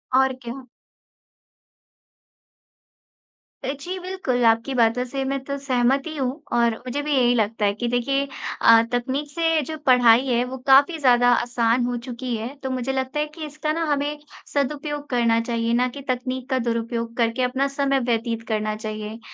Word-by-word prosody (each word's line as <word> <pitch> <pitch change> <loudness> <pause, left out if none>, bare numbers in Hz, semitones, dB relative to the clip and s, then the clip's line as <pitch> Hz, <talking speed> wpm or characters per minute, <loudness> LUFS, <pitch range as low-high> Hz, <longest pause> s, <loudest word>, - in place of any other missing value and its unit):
और 265 0 +4
क्या। 245 +2 -7 3.0
अ, - - -3
जी, 360 +6 -5
बिल्कुल, 360 -10 -2
आपकी 230 +4 +2
बातों 235 0 +2
से 270 +2 -3
मैं 275 0 -1
तो 280 +1 -4
सहमत 265 0 +1
ही 315 - -6
हूँ, 270 +2 -2
और 235 -1 +3
मुझे 260 +3 -2
भी 300 - -3
यही 245 -2 +4
लगता 220 -1 0
है 200 - +2
कि 235 +4 -3
देखिए 275 +4 0 0.3
अ, 230 0 +7
तकनीक 260 +4 -2
से 325 0 +1
जो 315 - -4
पढ़ाई 250 -1 +6
है, 245 -1 +2
वो 260 +1 -6
काफ़ी 280 +5 +6
ज़्यादा 245 -3 +4
आसान 240 0 +1
हो 245 0 -2
चुकी 250 -1 -4
है, 220 +1 -4 0.2
तो 265 - -2
मुझे 260 0 -2
लगता 265 +2 -2
है 300 - +1
कि 320 -2 -6
इसका 305 +1 -3
ना 330 +1 -1
हमें 290 +1 -1 0.4
सदुपयोग 290 +1 -2
करना 235 -2 +2
चाहिए, 230 0 -1
ना 250 +1 +3
कि 280 +3 -8
तकनीक 255 +1 -3
का 260 -1 +1
दुरुपयोग 230 0 -2
करके 230 +1 +1
अपना 260 +2 +1
समय 275 0 0
व्यतीत 230 -2 -2
करना 215 -1 -1
चाहिए। 215 0 -6
250 Hz, 175 wpm, -23 LUFS, 235-275 Hz, 3.0 s, अ